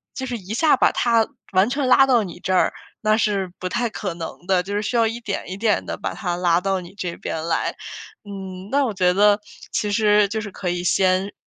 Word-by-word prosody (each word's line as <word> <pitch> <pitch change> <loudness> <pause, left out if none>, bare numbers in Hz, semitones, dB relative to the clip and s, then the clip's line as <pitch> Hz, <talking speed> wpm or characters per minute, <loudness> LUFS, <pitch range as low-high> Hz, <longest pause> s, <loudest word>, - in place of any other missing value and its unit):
就 265 - -4
是 245 -2 -3
一 195 +1 -7
下 300 +3 +4
把 - - +4
他 230 -2 +2 0.2
完 190 +3 +3
全 275 +1 -1
拉 270 +1 +7
到 245 -4 +4
你 180 -3 -8
这 185 0 -2
儿， - - +3 0.3
那 215 0 +3
是 200 -4 0
不 185 - -3
太 240 +5 -1
可 205 -4 -4
能 165 +1 -8
的， 185 -2 +2
就 200 +2 -6
是 205 - 0
需 215 - -3
要 230 -1 +4
一 225 +1 -2
点 215 -4 -4
一 190 - -5
点 215 0 +1
地 - - -4
把 - - -4
他 175 -4 -3
拉 175 -1 +2
到 195 0 0
你 175 0 -11
这 180 -4 -5
边 160 - -4
来。 165 - -1 0.5
嗯， 190 -2 -8
那 280 0 +3
我 225 - -2
觉 180 -2 +3
得 205 +1 +5 0.4
其 210 - 0
实 210 -1 +3
就 220 +1 -2
是 210 -1 -5
可 185 -1 -4
以 175 0 -2
先， 185 +2 +2
200 Hz, 255 characters per minute, -22 LUFS, 185-225 Hz, 0.5 s, 拉